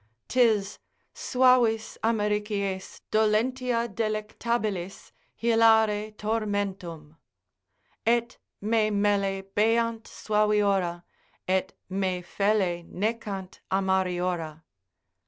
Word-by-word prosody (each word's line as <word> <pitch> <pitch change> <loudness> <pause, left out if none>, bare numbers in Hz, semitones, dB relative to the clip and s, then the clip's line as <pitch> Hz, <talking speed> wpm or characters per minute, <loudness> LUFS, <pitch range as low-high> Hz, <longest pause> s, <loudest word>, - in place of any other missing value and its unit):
'Tis 220 -5 +2 0.3
suavis 245 -4 +2
amaricies, 210 -3 -1
dolentia 235 +3 +1
delectabilis, 215 -2 -3 0.3
hilare 220 -2 +3
tormentum; 200 -8 -3 0.9
Et 235 0 +2 0.3
me 215 +1 +2
melle 200 -2 +1
beant 225 +1 +2
suaviora, 205 -5 +1 0.4
Et 190 0 0 0.2
me 185 -1 -1
felle 195 -2 0
necant 200 -2 -4
amariora. 180 -4 -1
210 Hz, 65 wpm, -27 LUFS, 190-225 Hz, 0.9 s, hilare